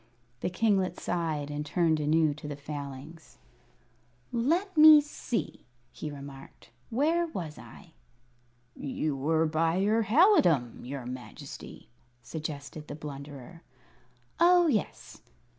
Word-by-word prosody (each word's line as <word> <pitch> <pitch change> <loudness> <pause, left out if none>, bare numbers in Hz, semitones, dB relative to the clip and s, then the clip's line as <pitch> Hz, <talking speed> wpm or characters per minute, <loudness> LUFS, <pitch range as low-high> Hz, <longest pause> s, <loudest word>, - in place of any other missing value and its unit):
The - - -2
kinglet 190 -2 +1
sighed, 155 -4 -2
and 145 0 -3
turned 160 +1 +1
anew 155 0 +2
to 150 0 -9
the 145 - -5
Failings. 145 +2 -8 0.9
"Let 335 - 0
me 310 -1 +10
see," 285 -5 -4 0.3
he 155 - -6
remarked; 140 -1 -11 0.2
"where 320 +8 +1
was 170 - -6
I?" - - -14 0.8
"You 145 +1 -3
were 160 +4 +1
by 160 +1 +1
your 210 +4 +2
halidom, 205 - +4
your 130 0 -6
Majesty," 125 0 -9 0.4
suggested 150 -1 -7
the - - -6
Blunderer. 145 +1 -9 0.8
"Oh, 350 +1 +6
yes." 245 - -2
160 Hz, 110 wpm, -29 LUFS, 145-225 Hz, 0.9 s, me